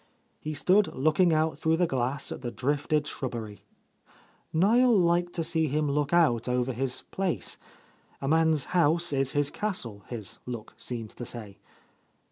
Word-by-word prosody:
He 155 0 -5
stood 190 +7 +4
looking 155 +6 +3
out 160 0 +1
through 160 0 +2
the 175 - +3
glass 130 -2 -1
at - - -6
the 120 - -3
drifted 145 +4 0
shrub 130 -2 -3
bery. 110 -4 -6 0.9
Niel 225 +7 +4
liked 175 0 +2
to 165 - -1
see 160 -1 +1
him 150 +2 0
look 145 0 0
out 140 -9 +3
over 125 +1 0
his 130 +1 -2
place. 190 -3 -2 0.6
A 135 - -4
man's 160 -1 +3
house 170 -1 +3
is 135 -1 0
his 145 -1 +1
castle, 120 - -4
his 110 -5 -7
look 120 -3 -6
seemed 115 -3 -6
to - - -8
say. 110 -4 -8
145 Hz, 160 wpm, -28 LUFS, 125-170 Hz, 0.9 s, stood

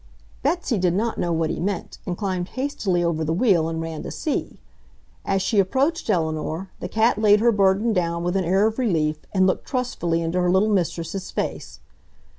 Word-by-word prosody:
Betsy 285 - 0
did 180 -1 +2
not 225 +3 -1
know 175 - 0
what 165 -1 0
he - - -4
meant 190 0 -3
and 175 -1 -2
climbed 185 -4 -2
hastily 240 -10 0
over 165 -2 0
the 160 - -1
wheel 175 -6 +3
and 165 0 -3
ran 165 -1 -4
to - - -6
see. - - -3 0.7
As 195 -1 +1
she 205 +1 +2
approached 265 - +1
Eleanor, 160 0 -1
the - - -5
cat 220 0 +2
laid 210 -1 +6
her 235 +2 +4
burden 200 +2 +2
down 170 -2 -1
with 175 +2 -1
an 190 - +2
air 190 +4 +3
of 220 +3 -1
relief 155 -10 +1
and 190 -2 +3
looked 185 - 0
trustfully 175 - -1
into 170 +2 0
her 180 - +2
little 190 +4 +3
mistress's 175 0 -2
face. 60 0 -4
185 Hz, 195 wpm, -23 LUFS, 170-215 Hz, 0.7 s, laid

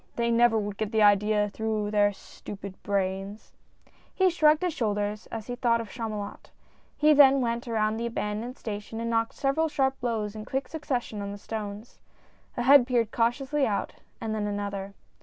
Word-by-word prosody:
They 235 0 +1
never 235 -1 +4
would 205 -2 -3
get 215 -1 -2
the 220 -2 +3
idea 210 +1 +4
through 215 0 -2
their 205 -1 +3
stupid 200 0 -10
brains! 195 +1 -3 0.3
" - - -32
He 375 -1 +4
shrugged 310 0 +4
his 355 -2 0
shoulders 210 -3 -2
as 225 -2 -6
he 245 - -4
thought 235 -1 +2
of 225 -3 -6
Chamu 225 -3 -4
lot. 205 0 -7 0.5
He 300 0 +5
then 275 -2 +7
went 235 -1 -2
around 220 -1 0
the 235 +1 -2
abandoned 225 +2 -4
station 210 +1 -6
and 230 0 -2
knocked 230 0 0
several 295 +4 +1
sharp 270 -2 0
blows 220 -4 -2
in 215 - -6
quick 265 +5 -3
succession 255 -9 -3
on 200 0 -4
the 205 - -7
stones. 210 +1 -7 0.6
A 240 - 0
head 265 -1 +7
peered 235 -4 +1
cautiously 265 +4 +1
out, 205 -2 -2 0.3
and 225 -1 -3
then 210 -1 -1
another. 200 -1 -4
225 Hz, 185 wpm, -27 LUFS, 205-245 Hz, 0.6 s, then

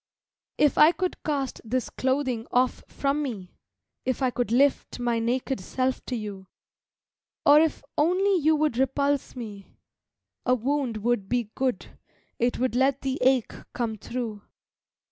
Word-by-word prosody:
If 295 -2 +3
I 310 +3 +8
could 365 0 -3
cast 280 -3 -2
this 245 +2 -2
clothing 260 -3 -1
off 250 +1 +1
from 280 +1 -1
me, 210 -10 -5 0.5
If 260 +1 -1
I 255 - +2
could 245 -2 -2
lift 275 +3 +2
my 240 -1 0
naked 250 +2 -1
self 255 +7 -2
to 255 - -2
you, 205 -4 -6 1.0
Or 290 +1 +8
if 315 -2 +1 0.2
only 370 +6 +3
you 315 -1 +3
would 300 -5 0
repulse 280 +1 0
me, 210 -5 -9 0.7
a 250 - +3
wound 255 -1 -1
would 230 -5 0
be 240 -4 -1
Good; 255 -7 -3 0.4
it 240 +1 +1
would 255 -1 0
let 265 +1 +2
the 265 0 -2
ache 255 -2 +3 0.2
come 230 -3 -2
through. 225 -1 -5
255 Hz, 145 wpm, -26 LUFS, 235-280 Hz, 1.0 s, I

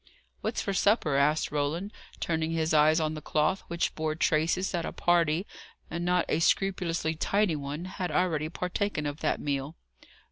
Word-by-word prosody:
"What's - - -2
for 200 - -2
supper?" 195 - +2
asked 150 +3 +2
Roland, 150 +8 -2 0.3
turning 160 -1 -1
his 160 -1 0
eyes 155 +2 +5
on 155 -1 0
the 155 - -6
cloth, 155 +6 +1
which 170 0 -1
bore 155 -1 -2
traces 165 +4 +1
that 175 -2 -1
a - - -4
party, 170 0 +2 0.5
and 170 +1 -3
not 180 0 +2
a 155 - +1
scrupulously 170 -3 +1
tidy 195 +2 +1
one, 145 +3 -5
had 185 -1 -4
already 155 -3 0
partaken 180 -2 -2
of 145 +1 -3
that - - 0
meal. 140 +2 -3
160 Hz, 170 wpm, -28 LUFS, 155-180 Hz, 0.5 s, eyes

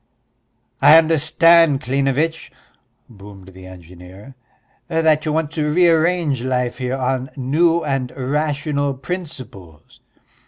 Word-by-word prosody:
"I 160 - +7
understand, 165 -1 +3
Klinevitch," 140 +5 -2 0.6
boomed 100 -3 -15
the 95 0 -14
engineer, 90 +6 -14 0.5
"that 160 -2 +1
you - - 0
want 155 -1 -2
to 150 -2 -2
rearrange 165 -4 +1
life 125 -1 -2
here 130 +1 -3
on 130 0 -3
new 165 +6 +1
and 135 -3 -3
rational 145 +1 -2
principles." 130 - -9
140 Hz, 105 wpm, -18 LUFS, 125-160 Hz, 0.6 s, I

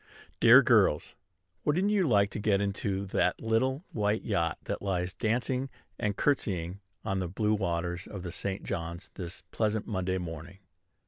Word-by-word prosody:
Dear - - +8
girls, 75 - +3 0.5
wouldn't 180 +7 +2
you 195 -5 +3
like 100 -3 +4
to - - -4
get 100 -1 +2
into 100 -1 -1
that 90 -2 +1
little 130 +8 0
white 105 0 0
yacht 85 -7 0
that - - -4
lies 90 -2 -1
dancing 125 +4 -1 0.3
and 105 -1 -1
courtesying 95 - 0 0.3
on 95 -3 0
the 90 - -1
blue 105 +4 0
waters 85 -2 -2
of 95 -3 -7
the 90 - -5
St. 95 +2 -4
John's 85 -1 -5
this 90 -2 -7
pleasant 110 -1 0
Monday 95 -3 -1
morning? 85 0 -7
100 Hz, 155 wpm, -30 LUFS, 90-110 Hz, 0.5 s, Dear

